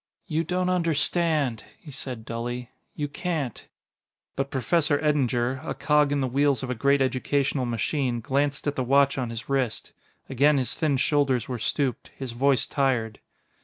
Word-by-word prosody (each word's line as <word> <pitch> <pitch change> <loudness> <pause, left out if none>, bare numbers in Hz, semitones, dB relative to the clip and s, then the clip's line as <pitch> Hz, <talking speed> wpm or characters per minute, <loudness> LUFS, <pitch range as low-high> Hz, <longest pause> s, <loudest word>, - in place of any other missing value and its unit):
"You 160 -2 -1
don't 180 +2 -1
understand," 160 -6 +1
he 150 - -12
said 125 -4 -6
dully; 120 +1 -4 0.2
"you 145 - -2
can't 150 - -4 0.3
" - - -62
But 135 0 -2
Professor 145 +4 +1
Eddinger, 130 -4 +1
a - - -4
cog 150 -1 +2
in 145 -1 +1
the 130 - +1
wheels 140 +1 +1
of 130 - -3
a - - +1
great 140 +3 +3
educational 135 0 0
machine, 120 +2 -1
glanced 140 +4 -1
at 145 -1 -1
the 130 - -1
watch 140 +2 +3
on 125 -2 -2
his 115 0 -6
wrist. 130 -5 -1 0.4
Again 140 +3 +3
his 130 -2 0
thin 150 -4 +1
shoulders 135 -4 +1
were 125 -2 -4
stooped, 135 +2 -1
his 130 -3 -4
voice 130 +2 +2
tired. 125 -6 0
135 Hz, 165 wpm, -26 LUFS, 125-145 Hz, 0.4 s, great